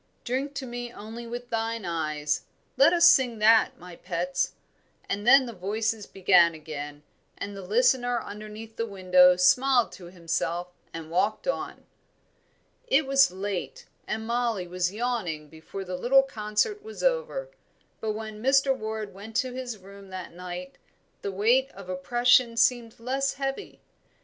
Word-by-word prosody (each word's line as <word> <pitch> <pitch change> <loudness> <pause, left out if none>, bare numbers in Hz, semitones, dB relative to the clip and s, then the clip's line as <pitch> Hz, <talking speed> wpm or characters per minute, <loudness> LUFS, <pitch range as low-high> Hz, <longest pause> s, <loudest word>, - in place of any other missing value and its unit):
'Drink 270 +3 -2
to 270 - -4
me 240 -1 -6
only 230 +2 -9
with 240 +1 -7
thine 225 -2 -2
eyes' 155 -3 -2 0.3
let 275 +5 +6
us 345 -1 +5
sing 250 -8 +5
that, 220 +1 +4
my 180 0 -11
pets." 180 +1 -2 0.5
And 205 +3 -3
then 270 +1 +7
the 235 - -7
voices 215 +3 -2
began 180 -3 +4
again, 150 -1 -7 0.3
and 205 0 -6
the 195 - -7
listener 245 +4 +2
underneath 215 +2 -9
the 230 - -1
window 185 -2 +5
smiled 245 +7 +4
to 180 - -11
himself 170 0 -3 0.2
and 165 -1 -8
walked 205 - 0
on. - - -3 1.0
It 280 +2 +3
was 275 0 +5
late, 190 0 -5 0.2
and 220 +1 -3
Mollie 235 -5 -1
was 180 0 -1
yawning 205 -10 -3
before 160 +5 -8
the 180 -1 -5
little 270 +8 +5
concert 225 - -1
was 440 +1 -9
over; - - 0 0.5
but 220 -1 -2
when 215 0 -7
Mr. 270 +1 +3
Ward 220 -3 -5
went 210 +3 -11
to 255 +1 0
his 250 -3 -5
room 195 0 -14
that 185 -2 -7
night 180 +1 -8 0.4
the 200 - -3
weight 235 +8 +3
of 195 -2 -11
oppression 240 +5 +3
seemed 235 -1 +2
less 270 +3 -1
heavy. 275 +8 -4
215 Hz, 150 wpm, -27 LUFS, 180-245 Hz, 1.0 s, then